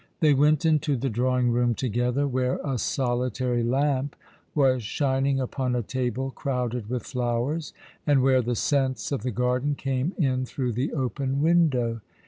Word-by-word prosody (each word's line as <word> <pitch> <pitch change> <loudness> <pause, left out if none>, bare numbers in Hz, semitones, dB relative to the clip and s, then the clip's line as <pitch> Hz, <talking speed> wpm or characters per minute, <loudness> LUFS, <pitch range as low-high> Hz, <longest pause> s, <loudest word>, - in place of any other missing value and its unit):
They 155 -2 +5
went 150 +3 +3
into 150 -2 +2
the 130 +1 -2
drawing 125 +1 +1
room 120 0 +2
together, 125 +4 0
where 130 -1 0
a 135 -4 -2
solitary 125 -1 0
lamp 135 +3 0 0.4
was 130 -4 +3
shining 135 +3 0
upon 130 -1 -1
a 120 - -1
table 130 +3 -2
crowded 125 -5 -3
with 125 -1 -2
flowers, 125 +5 -2 0.4
and 140 -3 +4
where 130 -1 +4
the 120 0 -1
scents 130 -3 0
of 140 - -1
the 125 - -2
garden 125 +4 0
came 135 +5 -2
in 130 -6 +1
through 125 -2 -2
the 125 +6 -2
open 135 0 -2
window. 135 -9 +2
130 Hz, 155 wpm, -26 LUFS, 125-140 Hz, 0.4 s, They